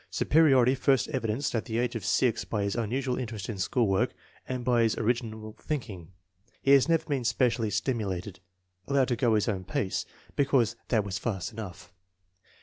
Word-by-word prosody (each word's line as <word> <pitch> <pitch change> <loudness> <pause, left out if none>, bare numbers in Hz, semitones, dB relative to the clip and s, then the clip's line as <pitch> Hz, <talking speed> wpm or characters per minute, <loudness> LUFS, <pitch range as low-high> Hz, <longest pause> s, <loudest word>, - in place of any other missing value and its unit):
Superiority 135 -5 +4
first 135 0 +2
evidenced 130 -1 -1
at 115 - -1
the 110 - -3
age 120 +1 0
of 115 - -4
6 125 -4 +1
by 105 -2 -2
his 100 0 -1
unusual 125 +3 -1
interest 110 -5 -5
in 105 -4 -4
school 115 +6 +1
work 95 -1 +1 0.3
and 125 -1 -3
by 120 -2 +3
his 115 -1 +2
orig 115 +2 +1
inal 110 -2 -8
thinking. 105 - -5 0.6
Has 140 +2 +5
never 165 -1 +2
been 140 -5 -1
specially 120 -1 +1
stimulated. 100 -3 -2 0.5
Allowed 135 -2 +2
to 120 - +1
go 120 -2 +2
his 105 - +1
own 95 -4 -1
pace 95 +1 -2 0.3
"because 135 -5 +2
that 110 -4 +2
was 95 -2 -4
fast 100 -5 -3
enough." 95 -4 -9
115 Hz, 175 wpm, -28 LUFS, 105-130 Hz, 0.6 s, Has